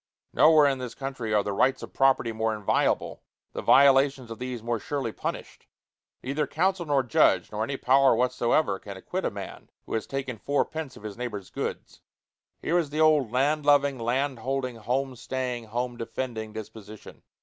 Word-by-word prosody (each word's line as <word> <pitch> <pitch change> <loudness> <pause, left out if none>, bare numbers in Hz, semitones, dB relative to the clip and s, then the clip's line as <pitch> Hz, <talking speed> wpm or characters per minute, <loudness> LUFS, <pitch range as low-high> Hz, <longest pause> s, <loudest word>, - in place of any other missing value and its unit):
Nowhere 155 -2 +6
in 135 -2 +1
this 125 -2 -6
country 135 -5 -5
are 105 -1 +3
the 105 - -3
rights 130 +6 +1
of - - -9
property 135 -3 +3
more 110 0 -1
inviolable, 105 -2 0 0.3
the - - -4
violations 135 -2 +4
of 115 - -7
these 125 -2 -5
more 120 -1 -1
surely 135 -1 -3
punished: - - -6 0.6
neither 140 +3 -1
counsel 185 +1 0
nor 140 -2 +2
judge 120 - +3
nor 105 +1 -2
any 135 +4 -3
power 135 0 +4
whatsoever 125 -2 +1
can 100 -2 -9
acquit 185 - -4
a - - +2
man 100 -1 -9 0.2
who - - -7
has 110 - -2
taken 135 -4 -4
fourpence 145 +1 -2
of - - -14
his 105 -1 -7
neighbor's 105 -6 -5
goods. - - -5 0.6
Here 175 +2 +2
is 160 -4 -2
the 150 +2 -4
old 155 -7 +4
land 145 +4 +1
loving, 140 -2 +3
land 130 +3 -1
holding, 130 0 -3
home 130 +4 -2
staying, 125 -1 -4
home 120 +2 -3
defending 115 -1 -5
disposition. 110 -1 -10
130 Hz, 175 wpm, -26 LUFS, 115-140 Hz, 0.6 s, Nowhere